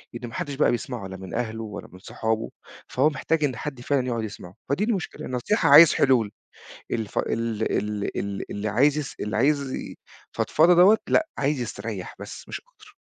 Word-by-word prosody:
إن 120 +1 -6
ما 115 - -11
حدش 145 - -3
بقى 150 - +3
بيسمَعه 120 -3 -4
لا 95 0 -8
من 95 -1 -9
أهله 115 -1 -3
ولا 105 -2 -7
من 90 - -13
صحابه، 110 +3 -2 0.4
فهو 135 +4 +2
محتاج 155 +2 -1
إن 135 -4 +1
حد 135 +1 -6
فعلًا 130 0 0
يقُعد 115 -2 -1
يسمَعه، 95 -4 -8
فدي 145 +9 +1
المشكلة. 210 -5 -2
نصيحة 125 - +1
عايز 155 +3 +9
حلول 120 -6 +3 0.6
الف 110 -3 -2
ال 115 -1 -1
ال 105 0 -2
ال 100 -1 -4
اللي 105 +1 -3
عايز 140 +8 +3
يس 145 -2 -4
اللي 105 +1 -2
عايز 140 +2 +2
ي - - -6 0.4
فضفضة 165 +3 +4
دوّة 190 +5 +7
لأ 320 0 +3
عايز 140 -1 0
يستريّح 110 -4 -5
بس - - -9
مش - - -5
أكتَر. 425 -4 -21
125 Hz, 190 wpm, -25 LUFS, 110-150 Hz, 0.6 s, عايز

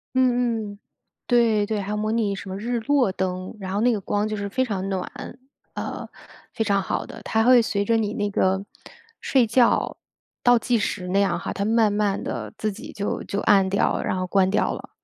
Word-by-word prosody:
嗯 245 -4 +1
嗯， 200 - -17 0.5
对 230 -4 +3
对。 210 0 -2
还 195 - -6
有 210 - -1
模 215 +1 -1
拟 215 -3 0
什 195 - -8
么 190 - -4
日 235 +3 -2
落 270 -5 +2
灯， 185 +2 -3
然 190 0 -5
后 205 - 0
那 245 +1 +4
个 215 - 0
光 205 +2 -1
就 215 -1 -3
是 200 0 -3
非 260 +6 0
常 195 -6 -3
暖， 190 -2 -3 0.6
呃， - - -5 0.5
非 225 - 0
常 200 -2 +1
好 - - -2
的。 - - -10
它 220 0 +1
会 250 0 +7
随 200 -2 -1
着 230 +2 +2
你 210 -1 -1
那 205 -2 -1
个 190 0 +1 0.6
睡 255 -4 +3
觉 235 +2 +2 0.5
倒 245 -1 +5
计 240 +1 +1
时 195 -3 -2
那 195 +2 +1
样 200 - +1
哈， - - -4
它 200 - -2
慢 220 -1 +3
慢 205 -1 0
地 110 -4 -5
自 215 -1 -1
己 215 +4 -9
就 205 -1 -3
就 200 - -3
暗 195 -3 +4
掉， 200 - +1
然 - - -1
后 185 - -2
关 190 0 +3
掉 210 - +1
了。 - - -9
210 Hz, 230 characters per minute, -24 LUFS, 195-230 Hz, 0.6 s, 会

